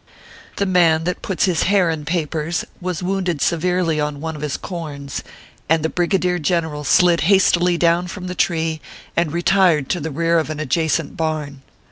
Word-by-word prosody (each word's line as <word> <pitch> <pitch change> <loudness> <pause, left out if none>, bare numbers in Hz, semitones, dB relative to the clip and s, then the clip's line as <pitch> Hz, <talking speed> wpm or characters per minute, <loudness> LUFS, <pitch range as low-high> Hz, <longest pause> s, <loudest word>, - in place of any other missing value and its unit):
The 200 - 0
Man 170 -4 +3
that 180 +1 -3
puts 190 - 0
his 180 -5 +1
hair 190 -4 +3
in 155 -2 -5
papers 165 0 -2 0.2
was 180 -1 -3
wounded 185 -4 -1
severely 170 0 +1
on 150 -1 -2
one 160 +1 -4
of 150 - -8
his 150 -2 -2
corns, 145 -6 -6 0.5
and 160 -1 +3
the 160 - +1
Brigadier 180 0 0
Gen 170 +2 +1
eral 150 -2 -6
slid 175 +3 +4
hastily 180 -3 +4
down 170 +1 +2
from 180 +1 -7
the 180 - -4
tree, 160 -3 0 0.3
and 170 -3 +1
retired 170 -3 +2
to 180 - 0
the 160 +1 -4
rear 165 +3 +1
of 155 - -3
an 155 -1 -4
adjacent 160 +1 -1
barn. 155 -4 -3
165 Hz, 180 wpm, -20 LUFS, 155-180 Hz, 0.5 s, slid